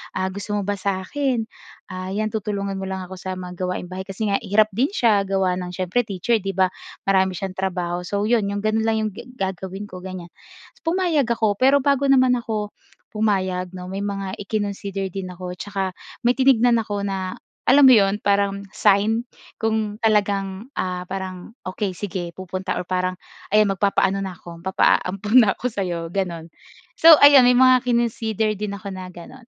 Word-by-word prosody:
ah, 185 0 -1
"Gusto 200 +2 -4
mo 205 - -1
ba 205 0 -2
sa 190 -1 -1
'kin? 265 -1 -1 0.5
Ah, 185 0 -5
'yan, 215 0 -1
tutulungan 200 -2 -3
mo 190 - -4
lang 190 -1 -4
ako 185 +1 -9
sa 185 0 -5
mga 180 -1 -8
gawaing 180 0 -3
bahay." 190 +2 -6
Kasi 195 +3 -5
nga 200 - +2
hirap 215 -1 +2
din 245 +8 +1
siya 220 - +2
gawa 190 -1 +1
ng 180 0 -6
siyempre 185 +5 -1
teacher, 205 +4 0
'di 195 -1 -4
ba? 185 -1 +2 0.3
Marami 190 -1 +2
siyang 190 +1 -4
trabaho. 180 -2 -2
So, 205 0 -1
'yon. 220 -2 +2
'Yong 200 0 -3
gano'n 220 +1 +1
lang 225 - +2
'yong 215 - -2
ge 200 - -11
gagawin 190 0 -4
ko, 185 -3 -9
ganyan. 180 -2 -8 0.6
Pumayag 335 -6 +1
ako, 220 -4 0
pero 270 +1 +4
bago 280 0 +2
naman 260 -2 +5
ako 215 -3 -3 0.4
pumayag 190 -4 -1
'no, 180 0 -7
may 195 - -4
mga 195 -2 -3
ikinonsider 200 -2 -3
din 190 0 -5
ako 180 0 -7
tsaka 195 -2 -3 0.3
may 240 - +4
tinignan 245 -3 +4
ako 205 -2 -3
na 190 -2 -3 0.3
alam 280 +2 +6
mo - - +9
'yon, 200 0 +3
parang 200 0 +1
sign 215 +4 +2 0.3
kung 220 -1 -1
talagang, 205 +1 0
ah, 180 -1 -2
parang 190 0 -6 0.2
okey 190 +1 -2
sige, 175 -3 -5
pupunta 185 0 -4
or 180 - -6
parang 185 0 -1 0.4
ayan, 215 0 +5
magpapaano 195 0 +1
na 185 -2 -5
ko, 170 -1 -10
magpapaampon 195 +3 +1
na 195 - +3
ako - - -11
sa 200 - -2
'yo, 170 -2 -3
gano'n. 175 -4 -3 0.5
So 325 -2 +8
ayun, 285 -3 +8
may 250 - +5
mga 255 -1 +6
kinonsider 225 -3 0
din 205 0 -4
ako 200 0 -9
na 185 -1 -8
gano'n. 180 +9 -12
200 Hz, 185 wpm, -22 LUFS, 185-220 Hz, 0.6 s, mo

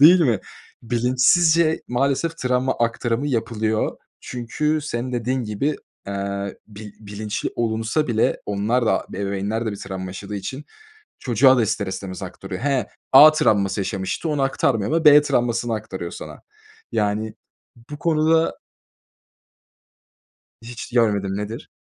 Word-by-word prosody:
Değil 175 +5 +8
mi? 120 - +2 0.4
Bilinçsizce 130 +8 +3
maalesef 140 +6 0
travma 125 -1 0
aktarımı 115 +2 0
yapılıyor 110 -3 -1 0.2
çünkü 150 +6 -2
senin 125 -3 -4
dediğin 125 +1 -1
gibi, 110 +8 -1 0.3
eee, 100 0 -4
bi 105 -1 -11
bilinçli 105 0 -4
olunsa 115 +6 0
bile 115 -2 +1
onlar 110 +4 0
da - - +1
ebeveynler 100 +3 -2
de - - 0
bir - - -6
travma 95 -1 -6
yaşadığı 100 +2 -7
için 135 +8 -6 0.6
çocuğa 130 +2 +4
da 120 - +3
ister 105 -2 -1
istemez 95 0 -6
aktarıyor. 95 +2 -7
He, 135 -2 0 0.2
A 145 +4 +10
travması 100 -9 +1
yaşamıştı, 95 - -3
onu 145 -2 0
aktarmıyor 135 -3 +1
ama 165 0 +1
B 150 0 +9
travmasını 120 -4 0
aktarıyor 95 -5 -5
sana. - - -9 0.5
Yani 105 +1 -1 0.6
bu 145 - -7
konuda 160 0 +2 2.1
Hiç 120 0 -8
görmedim. 100 -5 +1
Nedir? 105 +2 -6
115 Hz, 125 wpm, -22 LUFS, 105-135 Hz, 2.1 s, A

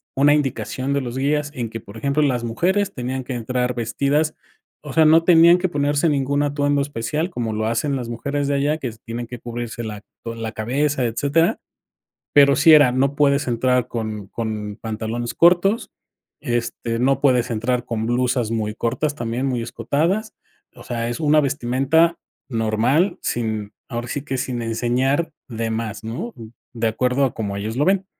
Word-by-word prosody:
una 145 +2 +5
indicación 135 -1 -1
de 140 - +1
los 125 -1 -5
guías 145 +2 0
en 120 -3 -3
que, 115 - -6
por 100 -1 -14
ejemplo, 140 +4 0
las 125 -4 +1
mujeres 185 - 0
tenían 130 +1 -3
que 130 - -5
entrar 125 +1 -1
vestidas, 140 +6 0 0.5
o 150 - -8
sea, 160 -1 +5
no 160 +2 +6
tenían 170 0 +7
que 185 +1 -1
ponerse 145 +1 +1
ningún 140 0 +1
atuendo 145 0 +1
especial 145 +5 -2
como 120 -9 -3
lo 110 +1 -1
hacen 135 +5 0
las 120 -3 -4
mujeres 140 +4 -2
de 140 - +1
allá 145 +2 +1
que 125 -5 -3
se 110 - -15
tienen 120 0 -6
que 125 0 -8
cubrirse 120 0 -5
la 105 -2 -6 0.2
toda 115 0 -5
la 115 -1 -4
cabeza, 135 +4 0
etcétera, 140 +8 +1 0.7
pero 140 -1 +6
sí 160 +2 +6
era: 145 -4 +7
"No 135 +2 +1
puedes 140 -1 +2
entrar 125 +1 +1
con 110 -4 -4
con 105 -1 -4
pantalones 115 +2 -3
cortos, 180 +6 +4 0.5
este, 120 -2 -2
no 135 +2 +2
puedes 125 -4 +3
entrar 120 +2 0
con 115 -2 -2
blusas 120 -1 0
muy 110 -2 -2
cortas, 145 +7 -1
también 120 0 -2
muy 125 -3 -1
escotadas". 165 - -1 0.4
O - - -13
sea 115 -1 -3
es 120 - -4
una 155 -1 +4
vestimenta 140 +5 +2 0.3
normal, 115 - +1
sin 110 -3 -2 0.2
ahora 120 -1 -4
sí 145 +3 -3
que 135 -2 -3
sin 125 -2 -3
enseñar 125 +7 0 0.2
de 115 -2 -3
más, 110 -1 -4
¿no?, 125 - -5 0.4
de 115 -1 0
acuerdo 125 +4 +1
a 130 - -2
como 100 -3 -3
ellos 110 +3 -4
lo 145 - +2
ven. 190 0 +2
125 Hz, 180 wpm, -21 LUFS, 115-145 Hz, 0.7 s, tenían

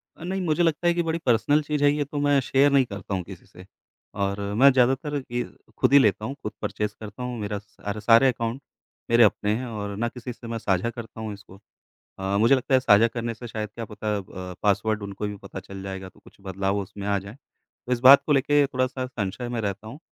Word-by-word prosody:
अ, - - -12
नहीं, 190 +2 -2
मुझे 170 0 +1
लगता 165 +1 +1
है 170 - +4
कि 170 0 0
बड़ी 165 0 -2
पर्सनल 135 +5 +3
चीज़ 150 -1 -2
है 145 - +6
ये 145 -1 -1
तो 145 +1 -5
मैं 145 -1 +4
शेयर 135 +3 +3
नहीं 135 -2 +4
करता 100 -2 -7
हूँ 95 -2 -1
किसी 95 -1 -12
से, 90 +1 -15 0.5
और 100 0 -2 0.2
मैं 140 - +9
ज़्यादातर 135 +3 +1
ये 120 0 -1 0.3
खुद - - +2
ही 140 - +9
लेता 105 -3 +2
हूँ, 135 +5 -4
खुद 105 - -3
परचेज़ 105 0 -3
करता 110 +3 -8
हूँ, 125 -1 -4
मेरा 105 -1 -3
सा 105 0 -7
सारे 115 +4 +5
अकाउंट 120 +1 -2 0.5
मेरे 115 0 +6
अपने 105 0 +2
हैं 130 - -4
और 105 -3 -5
ना 120 - 0
किसी 125 +1 -7
से 115 0 -12
मैं 115 - -3
साझा 100 -1 0
करता 115 -1 -9
हूँ 110 -1 -4
इसको। 95 -1 -14 0.6
अ, 95 +1 -1
मुझे 115 +6 +5
लगता 130 +1 -2
है 130 - +6
साझा 115 -2 +5
करने 115 0 -4
से 120 +1 -9
शायद 110 -1 -5
क्या 115 -1 -5
पता 105 0 -3
अ, - - -3
ब 90 -1 -9
पासवर्ड 105 +1 +1
उनको 100 +1 -4
भी 105 - -5
पता 95 - -9
चल 95 0 -10
जाएगा, 95 -1 -6
तो - - -23
कुछ - - -20
बदलाव 95 +1 -2
उसमें 100 +1 -6
आ 100 -1 +2
जाएँ, 100 +4 -11
तो 125 -2 -15
इस 120 - -2
बात 135 +2 +8
को 150 - -1
लेके 145 +1 +3
थोड़ा-सा 130 -1 -2
संशय 120 0 -4
में 120 - -3
रहता 100 +1 -4
हूँ। 135 +7 -9
115 Hz, 240 wpm, -25 LUFS, 100-130 Hz, 0.6 s, मैं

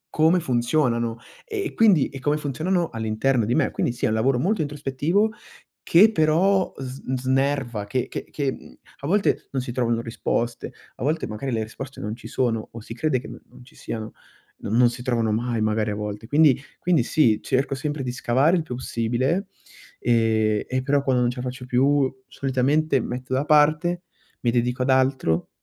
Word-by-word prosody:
come 160 +3 +4
funzionano 120 -4 0 0.3
e 420 -5 -4
quindi 200 -10 +4
e 135 - -8
come 145 +3 +1
funzionano 160 +5 -1
all'interno 115 +2 0
di 120 - 0
me. 155 -4 +2
Quindi - - -1
sì 120 +3 -3
è - - +3
un 110 - 0
lavoro 125 +3 +2
molto 195 +6 +1
introspettivo 150 +8 0 0.5
che 195 +6 +6
però 185 +3 +2
sn 130 0 -4
snerva, 130 -4 0
che 125 +4 -2
che - - -6
che 140 -3 -1
mhmm, - - -11 0.3
a 140 - -4
volte 200 +5 +1
non 135 - -1
si 125 - -5
trovano 120 -2 0
risposte, 115 0 -3 0.2
a - - -7
volte 155 +3 0
magari 110 +5 -4
le 115 -2 0
risposte 135 +5 -8
non 105 +1 -4
ci - - -11
sono 115 -4 -1
o 115 - -8
si 115 - -8
crede 130 +1 0
che - - -10
n - - -9
non - - -15
ci - - -20
siano, 110 -1 -6 0.5
non 110 - -2
non 125 -1 +6
si 120 +1 -8
trovano 115 -3 0
mai 115 0 -1
magari 110 0 0
a - - -3
volte. 105 +1 -5
Quindi 145 -3 +5 0.2
quindi 170 -8 +2
sì, 115 -5 +2
cerco 135 +1 0
sempre 145 +2 -3
di 125 - -2
scavare 135 +8 +2
il 165 - -1
più 125 - -6
possibile, 130 - -1 0.5
ehm, 110 -2 +2
e 130 0 -1
però 140 0 +1
quando 130 -2 +2
non 120 - +2
ce 125 - -10
la 125 - -4
faccio 125 0 -8
più, 135 +2 +2 0.2
solitamente 135 +3 +1
metto 130 +3 -5
da 130 - +1
parte, 155 +4 +3 0.4
mi 120 - +1
dedico 125 +1 0
ad 135 - -2
altro, 130 -11 +1
130 Hz, 190 wpm, -24 LUFS, 120-150 Hz, 0.5 s, che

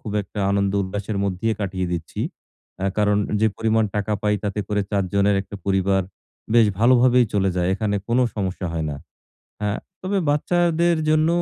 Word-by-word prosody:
খুব 105 - -6
একটা 100 +1 -7
আনন্দ 100 -1 +1
উল্লাসের 100 +2 -4
মধ্যেই 100 +4 -1
কাটিয়ে 95 -2 -2
দিচ্ছি। 85 -1 -4 0.6
আ - - 0
কারণ, 105 -1 +3 0.2
যে 110 - +4
পরিমাণ 110 0 +2
টাকা 105 +1 -1
পাই 105 0 +2
তাতে 105 +1 -1
করে 105 -1 +1
৪ 100 -1 +1
জনের 100 0 +3
একটা 100 - -9
পরিবার 95 0 +2 0.5
বেশ 115 -2 +6
ভালোভাবেই 125 +1 +5
চলে 95 -1 +2
যায়। 90 0 +1
এখানে 105 0 -1
কোন 120 +2 +2 0.2
সমস্যা 95 -2 -3
হয় 80 -1 -2
না। 70 - -5 0.6
হ্যাঁ, 105 0 -1 0.2
তবে 195 +1 0
বাচ্চাদের 170 +2 +2
জন্য, 155 +1 +3
105 Hz, 170 wpm, -22 LUFS, 95-115 Hz, 0.6 s, বেশ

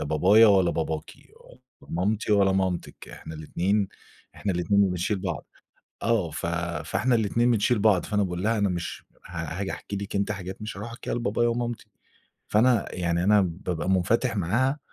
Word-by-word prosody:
لا - - -2
بابايا 95 +9 +6
ولا 95 -4 +4
باباكِ، 80 -1 -3 0.7
لا - - -17
مامتي 105 +5 0
ولا 100 -2 +4
مامتِك، 95 -2 -2
إحنا 80 - -9
الاتنين 95 +6 0 0.5
إحنا 100 - -2
الاتنين 90 +3 +2
اللي 100 -2 +4
بنشيل 90 +3 -1
بعض." 90 -7 -4 0.6
آه. 115 -7 +1
ف 80 - -4 0.4
فإحنا 120 +6 +1
الاتنين 115 +3 +2
بنشيل 115 +1 +2
بعض، 100 -4 +3
فأنا 105 -1 +1
باقول 90 -1 -3
لها: 110 +2 +2
"أنا 100 -1 +2
مش 85 -1 -4 0.2
ها 85 +1 -5
هاجي 95 -1 -2
أحكي 100 - -6
لِك 100 +1 -5
أنتِ 100 +1 0
حاجات 95 -1 -6
مش 105 -2 -6
هاروح 110 +3 -6
أحكيها 115 - -5
لبابايا 120 0 0
ومامتي." 120 0 -3 0.6
فأنا 115 +1 +2
يعني 85 -1 0
أنا 105 +2 +5
بابقى 90 -1 -3
مُنفَتِح 110 +6 +2
معاها 130 - +1
100 Hz, 175 wpm, -26 LUFS, 90-110 Hz, 0.7 s, بابايا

